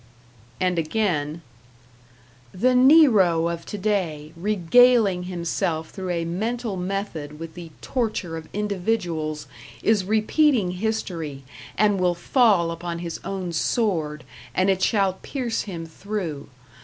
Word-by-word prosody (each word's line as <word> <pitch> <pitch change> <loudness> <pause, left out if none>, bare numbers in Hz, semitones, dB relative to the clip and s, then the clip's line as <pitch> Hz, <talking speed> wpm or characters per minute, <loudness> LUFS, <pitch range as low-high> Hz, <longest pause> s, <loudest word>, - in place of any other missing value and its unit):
And 180 -2 +1
again: 160 -3 -1 1.1
The 255 +7 +2
Nero 240 - +5
of 170 -1 -5
today, 185 -7 -2
regaling 205 +1 +4
himself 170 -2 -2
through 190 -2 -6
a 170 -1 -1
mental 220 +5 -2
method 180 -5 -4
with 165 0 -8
the 175 -2 -9
torture 220 -9 -2
of 160 -1 -8
individuals, 180 -7 -2 0.4
is 215 -3 +3
repeating 220 - +2
history, 180 -8 -3 0.3
and 205 -1 +3
will 180 -1 +2
fall 190 -3 +3
upon 170 0 -5
his 170 -1 -5
own 185 -3 -4
sword, 160 -6 0 0.3
and 185 +1 +3
it 190 -1 -1
shall 195 -4 +2
pierce 250 -5 -2
him 165 -3 -5
through. 165 -4 -5
185 Hz, 120 wpm, -24 LUFS, 165-215 Hz, 1.1 s, Nero